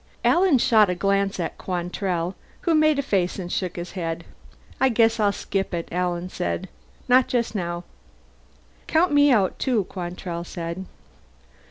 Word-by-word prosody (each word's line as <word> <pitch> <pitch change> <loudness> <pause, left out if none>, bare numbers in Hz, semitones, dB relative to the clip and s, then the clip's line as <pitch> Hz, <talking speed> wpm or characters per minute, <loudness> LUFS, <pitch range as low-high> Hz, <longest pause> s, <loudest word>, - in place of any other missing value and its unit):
Alan 350 -5 +5
shot 220 -5 +4
a 180 - 0
glance 195 +2 0
at - - -4
Quantrell, 180 0 -2 0.3
who 340 - +1
made 310 -1 +4
a 280 - 0
face 190 -8 0
and 175 -2 -5
shook 180 -2 -2
his 175 0 -6
head. 165 -3 -4 0.6
"I 265 - +4
guess 230 -1 +3
I'll 205 -1 +3
skip 195 -2 -3
it," 170 - -4
Alan 180 0 -1
said. 85 - -3 0.4
"Not 255 0 +5
just 235 -2 0
now." 175 -3 -3 1.0
"Count 340 +2 +3
me 290 0 +5
out 200 -7 +2
too," 245 -6 +1
Quantrell 175 -1 -5
said. 170 +2 -5
195 Hz, 155 wpm, -24 LUFS, 175-240 Hz, 1.0 s, Alan